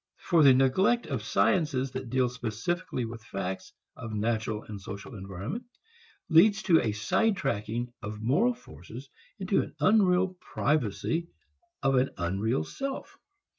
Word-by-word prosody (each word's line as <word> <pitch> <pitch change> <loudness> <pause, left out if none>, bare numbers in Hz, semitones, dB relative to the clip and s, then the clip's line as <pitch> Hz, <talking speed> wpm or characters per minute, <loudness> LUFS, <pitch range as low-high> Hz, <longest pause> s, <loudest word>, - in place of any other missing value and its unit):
For 170 -3 +2
the 135 -3 +8
neglect 185 - +3
of 135 -7 -3
sciences 135 - +1
that 130 -2 -5
deal 130 0 +2
specifically 125 - -3
with 115 0 -8
facts 95 -2 -5 0.2
of 115 - -7
the 110 - -4
natural 110 0 -1
and 105 -2 -8
social 100 +6 -8
environment 100 - -6 0.6
leads 200 +6 +5
to 170 -5 +5
a 110 - 0
side 180 - +1
tracking 115 - -2
of 105 0 -6
moral 180 - +2
forces 115 - -12 0.3
into 195 -1 +1
an - - -8
unreal 185 -2 +3
privacy 155 +4 -1 0.6
of 135 - +3
an 130 +2 +3
unreal 95 +1 0
self. 275 - -5
125 Hz, 140 wpm, -28 LUFS, 105-175 Hz, 0.6 s, the